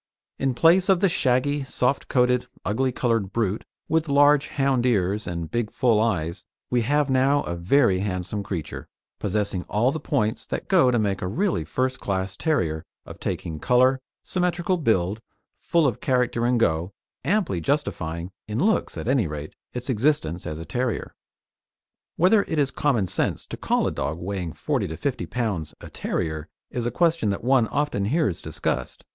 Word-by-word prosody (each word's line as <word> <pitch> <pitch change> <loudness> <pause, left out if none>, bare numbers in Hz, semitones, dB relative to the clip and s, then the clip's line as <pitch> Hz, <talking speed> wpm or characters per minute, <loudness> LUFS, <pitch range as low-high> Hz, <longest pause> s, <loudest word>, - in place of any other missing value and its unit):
In 135 -2 0
place 175 +7 +5
of 190 -2 +5
the 195 - +4
shaggy, 140 -2 +1
soft 130 0 0
coated, 125 -1 +2 0.2
ugly 130 +7 +1
coloured 115 -6 0
brute 105 -1 -1 0.2
with 160 -1 +1
large 145 0 +5
hound 135 -3 +1
ears 105 -4 +1
and 85 -2 -4
big 120 -2 -1
full 120 -4 +3
eyes, 85 -7 -1 0.3
we 125 -1 +3
have 145 +4 +2
now 135 +2 +3
a 85 - -4
very 95 +3 +3
handsome 95 +1 -2
creature, 85 -6 -5 0.3
possessing 100 -2 -1
all 115 +5 +2
the 160 - -3
points 120 -7 -1
that - - -4
go 175 -9 +5
to 120 - +2
make 100 -3 0
a 90 - -2
really 180 - 0
first 130 0 -1
class 95 -1 -2
terrier 85 - 0 0.2
of - - -10
taking 80 -2 -4
colour, 130 - +4 0.2
symmetrical 180 0 0
build, 110 - +1 0.4
full 170 -2 +2
of 125 -6 0
character 125 -2 +1
and 125 -1 +2
"go," 85 -2 +1 0.3
amply 180 - +1
justifying 85 - -2 0.2
in 105 0 -3
looks, 210 - +1
at - - -5
any 130 -7 +2
rate 75 0 -6 0.2
its 125 0 -6
existence 115 - 0
as 75 - -4
a 80 - -7
terrier. 125 +2 -2 1.0
Whether 195 +5 +5
it 160 - -2
is 140 -2 +2
common 130 -9 +1
sense 90 - -1
to - - -6
call - - 0
a - - 0
dog 70 +4 -3
weighing 90 -2 -4
40 - - -1
lb. - - -9
to 80 - -5
50 140 -3 -2
lb. 95 -12 -2
a - - -10
terrier 80 -3 -3 0.2
is 120 -1 -2
a - - +1
question 165 -7 +2
that 100 - -2
one 125 -2 +4
often 145 -9 -1
hears 130 - 0
discussed. - - -3
120 Hz, 175 wpm, -24 LUFS, 95-140 Hz, 1.0 s, place